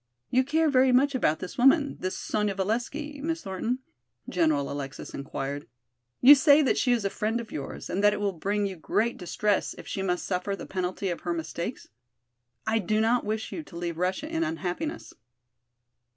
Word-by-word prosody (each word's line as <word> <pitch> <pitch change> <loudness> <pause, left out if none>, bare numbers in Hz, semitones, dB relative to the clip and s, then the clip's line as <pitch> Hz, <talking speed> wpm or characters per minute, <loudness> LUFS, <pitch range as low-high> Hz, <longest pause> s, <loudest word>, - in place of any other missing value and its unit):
"You 255 +1 +4
care 315 +4 +2
very 260 -2 +4
much 275 +3 +4
about 160 -12 +2
this 185 +6 -7
woman, 280 +3 +4
this 185 0 -3
Sonya 210 -2 -1
Valesky, 245 +9 -2
Miss 325 +2 -2
Thornton?" 225 +7 -3 0.4
General 155 -5 +1
Alexis 135 -2 -6
inquired. 140 +1 -5 0.5
"You 270 +4 +11
say 290 +1 +6
that 265 - +2
she 250 - +2
is 235 -4 +1
a - - +2
friend 220 +2 -1
of 230 -2 -8
yours 140 - -6
and 195 +3 -2
that 205 - +7
it 210 - -3
will 205 -1 +1
bring 200 +4 -1
you 190 -2 -4
great 225 +8 0
distress 200 +3 0
if - - -10
she 195 - -3
must 180 -2 -1
suffer 190 +2 -1
the - - -8
penalty 185 +1 -2
of 175 - -3
her 175 - -2
mistakes? 170 +6 -5 0.8
I 225 - +2
do 215 +2 0
not 230 +3 +3
wish 215 +1 -2
you - - -4
to 190 - -11
leave 170 -1 -4
Russia 185 +11 -1
in 325 +1 -1
unhappiness." 320 - -3
210 Hz, 190 wpm, -27 LUFS, 180-260 Hz, 0.8 s, You